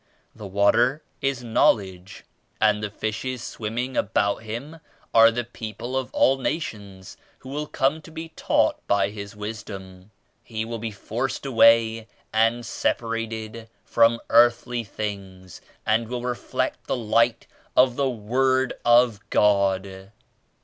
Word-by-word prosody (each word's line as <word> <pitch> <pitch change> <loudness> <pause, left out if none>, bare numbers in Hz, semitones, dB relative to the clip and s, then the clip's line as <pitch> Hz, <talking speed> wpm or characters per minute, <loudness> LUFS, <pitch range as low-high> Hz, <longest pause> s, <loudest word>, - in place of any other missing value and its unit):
The 105 -2 -9
water 115 +8 +2 0.2
88 135 - +2
is 130 -3 -5
Knowledge 95 -5 0 0.4
and 105 -1 +3
the 105 - -3
fishes 110 +5 -4
swimming 120 +4 -4
about 100 0 +1
Him 120 +9 -7 0.3
are 115 0 +8
the 120 +1 -2
people 115 +1 -7
of 130 -1 -2
all 135 0 +3
nations 100 - -5 0.2
who 130 - -12
will 150 +2 -4
come 145 +4 0
to 165 - -14
be 165 0 -7
taught - - +1
by 100 0 +2
His 100 -1 -8
Wisdom. 100 -3 -8 0.3
He 110 -1 -4
will 115 0 -5
be 115 +1 -3
forced 120 +6 -4
away 115 -3 +4 0.3
and 115 +2 +2
separated 115 0 -3 0.2
from 115 0 +3
earthly 120 +1 +4
things 95 -4 -7 0.2
and 110 +1 +1
will 120 +1 -4
reflect 125 -1 -3
the - - -1
Light 115 +1 +1 0.3
of 125 -1 +5
the 140 0 +1
Word 130 +3 +1
of 120 -2 +4
God.' 95 -1 +1
115 Hz, 135 wpm, -24 LUFS, 105-125 Hz, 0.4 s, are